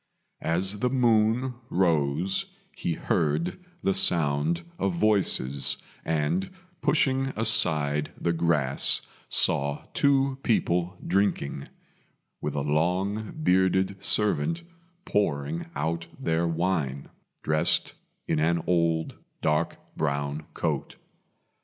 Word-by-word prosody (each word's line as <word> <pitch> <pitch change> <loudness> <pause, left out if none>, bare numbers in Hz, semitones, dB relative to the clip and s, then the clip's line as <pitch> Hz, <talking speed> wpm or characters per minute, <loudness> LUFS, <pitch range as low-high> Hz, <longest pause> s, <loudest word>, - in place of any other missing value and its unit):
As 95 +5 0
the 125 - +1
moon 120 0 +2 0.2
rose 85 0 +1 0.3
he 85 - -2
heard 80 - -1 0.2
the 95 - +2
sound 80 0 +2 0.2
of 95 -2 0
voices, 85 -10 +2 0.3
and, 80 +3 -1 0.3
pushing 135 -3 +2
aside 75 -10 +2
the 85 - 0
grass, 80 -5 +2 0.3
saw 70 +1 +2
two 135 -1 +2
people 90 -6 0
drinking, 90 -7 0 0.7
with - - -3
a 70 - 0
long 90 +8 0
bearded 95 0 +2
servant 165 +11 +2 0.4
pouring 80 -5 -1
out 80 +3 -2
their 80 +1 0
wine, 80 -5 -1 0.4
dressed 75 0 +3 0.3
in - - 0
an 85 +1 +1
old 85 -2 +1 0.3
dark 75 0 +1 0.2
brown 70 0 -2
coat. - - -2
85 Hz, 95 wpm, -26 LUFS, 75-100 Hz, 0.7 s, dressed